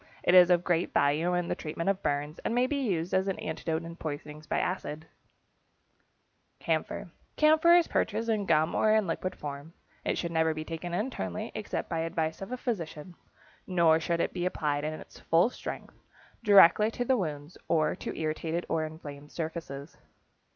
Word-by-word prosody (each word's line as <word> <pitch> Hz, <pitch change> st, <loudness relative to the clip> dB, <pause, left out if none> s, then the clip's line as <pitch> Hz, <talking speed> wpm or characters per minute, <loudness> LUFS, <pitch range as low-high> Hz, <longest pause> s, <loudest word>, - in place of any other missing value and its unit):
It 175 Hz, -, +3 dB
is 180 Hz, -1 st, +8 dB
of 175 Hz, -1 st, +4 dB
great 175 Hz, -1 st, 0 dB
value 155 Hz, +5 st, +2 dB
in 175 Hz, -1 st, -1 dB
the -, -, 0 dB
treatment 165 Hz, +2 st, -5 dB
of 195 Hz, -1 st, +1 dB
burns, 145 Hz, +2 st, -2 dB
and 230 Hz, -, -2 dB
may 245 Hz, +1 st, +3 dB
be 280 Hz, +2 st, -1 dB
used 170 Hz, -1 st, -1 dB
as 190 Hz, +1 st, +2 dB
an 195 Hz, -, -1 dB
antidote 160 Hz, +1 st, -3 dB
in 165 Hz, 0 st, -8 dB
poisoning 150 Hz, -1 st, -6 dB
by -, -, +1 dB
acids. 160 Hz, -4 st, -3 dB, 1.5 s
=Camphor.= -, -, -2 dB, 0.2 s
Camphor 315 Hz, +3 st, +6 dB
is 345 Hz, -1 st, +4 dB
purchased 225 Hz, +2 st, -1 dB
in 215 Hz, -3 st, 0 dB
gum 160 Hz, 0 st, +3 dB
or 215 Hz, 0 st, +3 dB
in 215 Hz, -2 st, +3 dB
liquid 185 Hz, +2 st, -3 dB
form. 145 Hz, +3 st, -7 dB, 0.3 s
It 170 Hz, -, -1 dB
never 160 Hz, -1 st, +2 dB
should 160 Hz, -, -1 dB
be 155 Hz, 0 st, -5 dB
taken 170 Hz, +2 st, -4 dB
internally, 175 Hz, -, -3 dB
except -, -, -4 dB
by 165 Hz, -, -2 dB
advice 160 Hz, 0 st, -2 dB
of 195 Hz, -, -6 dB
a 255 Hz, -, -2 dB
physician. 175 Hz, -, -4 dB, 0.5 s
Nor 170 Hz, -3 st, +4 dB
should 170 Hz, +1 st, 0 dB
it -, -, -1 dB
be 175 Hz, 0 st, -1 dB
applied 145 Hz, -5 st, -1 dB
in 155 Hz, +1 st, -2 dB
its -, -, -12 dB
full 170 Hz, +9 st, +3 dB
strength -, -, -7 dB, 0.5 s
directly 205 Hz, 0 st, +7 dB
to 245 Hz, +2 st, -3 dB
the 260 Hz, -, +3 dB
wounds 155 Hz, -, -4 dB
or 155 Hz, -2 st, +2 dB
to -, -, -6 dB
irritated 160 Hz, +2 st, -2 dB
or 160 Hz, -1 st, 0 dB
inflamed 150 Hz, -2 st, -8 dB
surfaces. 160 Hz, -3 st, -6 dB
165 Hz, 180 wpm, -29 LUFS, 155-190 Hz, 1.5 s, is